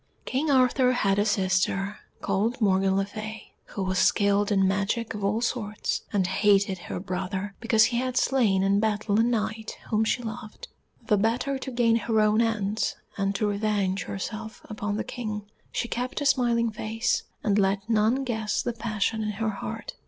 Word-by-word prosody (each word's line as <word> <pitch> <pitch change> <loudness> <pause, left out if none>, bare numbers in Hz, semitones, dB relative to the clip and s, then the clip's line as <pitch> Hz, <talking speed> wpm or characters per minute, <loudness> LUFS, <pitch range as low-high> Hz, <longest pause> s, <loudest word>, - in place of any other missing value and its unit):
King 285 +4 -1
Arthur 255 -1 +4
had 200 -5 +2
a 205 - +3
sister 195 0 0 0.2
called 210 +6 0
Morgan 195 -2 +3
le 195 - +1
Fay, 215 +1 -8
who 195 - -5
was 185 0 0
skilled 200 +1 +3
in 195 -2 +4
magic 200 +4 -1
of 210 -2 -6
all 210 +3 +1
sorts, 220 -3 -2
and 195 -3 +1
hated 195 0 +2
her 175 - -5
brother 190 +2 -3
because 225 -2 +4
he 235 0 0
had 255 0 -1
slain 215 -8 +3
in 200 +1 +3
battle 210 -1 +1
a - - +5
Knight 220 -2 -2
whom 215 0 +3
she 245 +2 0
loved. 215 -1 -7 0.4
The 210 - +3
better 250 +6 0
to 265 - -5
gain 235 -2 +3
her 225 0 0
own 215 +1 +4
ends, 215 -2 0 0.2
and 195 0 -1
to 210 - 0
revenge 205 -2 0
herself 215 +2 -6
upon 210 -1 -3
the - - -1
King, 215 -4 -5 0.3
she - - -2
kept 250 +2 -3
a 290 - -2
smiling 240 -4 +2
face, 225 +3 -1 0.2
and 205 -1 +2
let 195 +1 +1
none 225 +4 +2
guess 220 -4 -1
the 240 - -2
passion 220 -1 -1
in 215 0 -2
her 220 +2 -1
heart. 195 - -6
215 Hz, 180 wpm, -26 LUFS, 200-230 Hz, 0.4 s, a